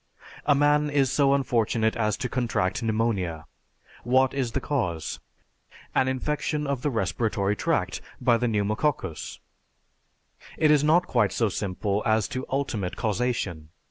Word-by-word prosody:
A 145 - +5
man 145 +1 +3
is 140 -3 +2
so 140 -1 +3
unfortunate 115 -4 +1
as 105 -2 0
to 130 - -2
contract 120 -6 -1
pneumonia. 110 -8 -1 0.6
What 130 +2 +3
is 130 -4 -2
the - - +1
cause? 90 - -2 0.7
An 130 - +2
infection 150 +3 -1
of 140 -3 -2
the 145 - 0
respiratory 105 - 0
tract - - -1 0.2
by 120 -1 +3
the 125 - 0
pneumococcus. 105 - -1 1.2
It 155 -1 +4
is 150 -1 +4
not 165 +4 +4
quite 120 - +2
so 115 -3 +1
simple 100 +1 -2
as 110 -1 +2
to 130 0 -4
ultimate 120 -9 -2
causation. 105 -8 -2
120 Hz, 140 wpm, -26 LUFS, 105-140 Hz, 1.2 s, A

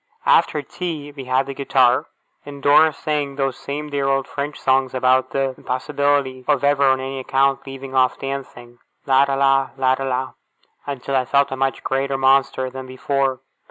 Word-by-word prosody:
After 150 - +3
tea 155 -2 -6
we 140 -2 -9
had 130 +1 +1
the 140 - -6
guitar; 130 -2 +2 0.4
and 140 -1 -10
Dora 155 +2 +6
sang 150 -2 -3
those 135 -2 -1
same 150 +1 -6
dear 140 -1 -1
old 135 -1 0
French 145 +1 -5
songs 130 0 +1
about 130 0 +2
the 135 -1 -1
impossibility 135 0 -1
of 145 -2 +1
ever 140 0 +3
on 130 0 +3
any 135 0 -5
account 135 +1 0
leaving 135 0 -8
off 130 -1 +2
dancing, 125 -3 -7 0.3
La 135 0 +4
ra 140 -1 -1
la, 135 0 +2
La 130 0 +3
ra 135 +1 -3
la, 130 0 -2 0.6
until 140 -1 -3
I 130 -1 +2
felt 140 +2 +2
a - - -2
much 135 0 -2
greater 135 +1 -1
Monster 135 -1 +2
than 130 0 -8
before. 130 0 -1
135 Hz, 180 wpm, -21 LUFS, 130-140 Hz, 0.6 s, Dora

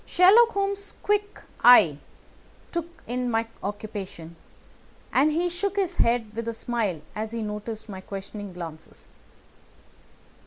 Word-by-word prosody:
Sherlock 440 +6 +6
Holmes' 400 0 -2
quick 415 0 0 0.2
eye 180 - +8 0.7
took 340 -1 -2 0.2
in 250 +1 -2
my 225 -1 +1 0.2
occupation, 200 -5 -6 0.8
and 290 +4 +4
he 340 +3 +1
shook 355 +3 -2
his 375 -3 0
head 230 -2 +1
with 230 +1 -4
a 230 - -2
smile 220 -9 -2
as 215 +1 -4
he 230 -1 -2
noticed 210 +1 -5
my 190 -3 -7
questioning 200 +1 -7
glances. 165 -3 -9
230 Hz, 125 wpm, -26 LUFS, -, 0.8 s, eye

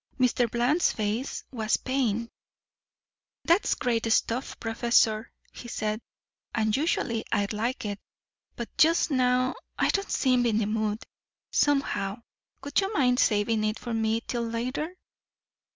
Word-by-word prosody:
Mr. 245 -1 +2
Bland's 245 +9 +2
face 220 +5 -2
was 225 -4 0
pained. 235 -4 -1 1.2
"That's 340 +5 +3
great 230 -2 0
stuff, 235 +4 0
Professor," 225 -1 +2 0.2
he 240 - -9
said, 215 -1 -2 0.5
"and 220 -1 +1
usually 265 -7 0
I'd 205 +1 0
like 230 +3 -2
it. 205 -1 -3 0.6
But 235 - -7
just 330 0 +4
now 255 -1 +2 0.2
I - - +2
don't 395 0 0
seem 250 -2 +2
in 220 -2 +2
the 220 - +1
mood, 215 0 -1 0.5
somehow. 230 -7 +1 0.4
Would 285 +6 +1
you 390 +1 -2
mind 250 -6 +3
saving 215 0 +2
it 215 +1 0
for 240 - -5
me 225 0 +1
till 240 0 -3
later?" 240 +7 -2
235 Hz, 135 wpm, -27 LUFS, 220-255 Hz, 1.2 s, just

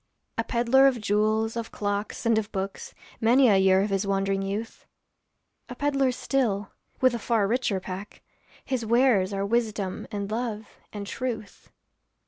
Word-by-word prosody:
A - - +2
peddler 240 +4 +4
of 255 -3 +1
jewels, 215 +2 +1
of 230 -1 -4
clocks, 205 +2 -3
and 230 -1 +4
of 215 -1 -6
books, 195 0 -5 0.2
Many 245 +3 +5
a 200 - +5
year 190 0 +4
of 205 - -2
his 195 +1 0
wandering 195 0 0
youth; 200 +4 -5 0.8
A 250 - -6
peddler 275 -1 +1
still, 230 -6 -1 0.3
with 255 -1 +5
a 235 - -2
far 220 -2 +1
richer 230 -3 0
pack, 190 +2 -8 0.4
His 260 -3 -2
wares 225 -4 +3
are 195 0 -1
wisdom 215 -3 -1
and 200 -1 -4
love 220 -2 -3 0.2
and 205 -1 -6
truth. 230 -1 -5
215 Hz, 155 wpm, -26 LUFS, 200-240 Hz, 0.8 s, Many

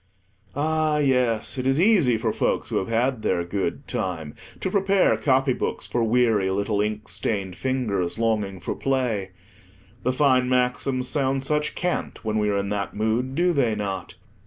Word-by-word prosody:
Ah, 155 +1 +1
yes, 125 -3 +1
it 130 - -1
is 135 +3 +2
easy 175 - +4
for 110 - -1
folks - - -1
who - - +1
have 95 - -1
had 120 +1 0
their 85 - 0
good 95 +3 -3
time, 80 -5 -3 0.3
to 190 - -2
prepare 195 -1 +3
copybooks 135 -2 0
for 120 - -1
weary 115 -4 +2
little 100 +2 0
inkstained 105 -2 -2
fingers, 110 -9 -1
longing 105 -4 0
for 90 - -3
play. 125 -8 -1 0.7
The 125 - +1
fine 130 -2 +3
maxims 125 0 0
sound 135 -1 0
such 150 +2 -1
cant 180 -9 -3
when 110 0 0
we 105 0 +1
are 100 - +1
in 100 0 -2
that 100 -1 -3
mood, 115 +5 0
do 175 +2 +2
they 125 -7 +2
not? 100 -2 -4
125 Hz, 160 wpm, -24 LUFS, 105-135 Hz, 0.7 s, easy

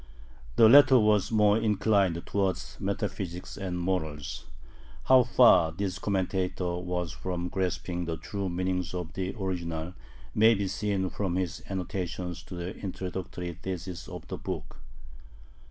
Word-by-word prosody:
The 115 - +7
latter 135 +2 +8
was 105 -1 +3
more 105 -1 +4
inclined 100 -5 +2
towards 95 -5 -1
metaphysics 95 -3 -3
and 95 -3 -4
morals. 80 -6 -3 0.6
How 130 -1 +7
far 120 -10 +5
this 95 +2 -3
commentator 95 -2 -1
was 90 -1 -3
from 90 -1 -4
grasping 90 -1 -2
the 80 -1 -3
true 100 +4 -4
meaning 90 +1 -1
of 90 -1 -5
the 95 +1 -3
original 85 -3 -3 0.4
may 110 +2 +6
be 100 -1 -1
seen 95 -2 -1
from 95 -4 -2
his 90 -2 -2
annotations 90 -2 -4
to 90 - -8
the 85 +3 -5
introductory 90 -2 -5
theses 90 0 -6
of - - -8
the - - -5
book. - - -6
95 Hz, 135 wpm, -28 LUFS, 90-100 Hz, 0.6 s, latter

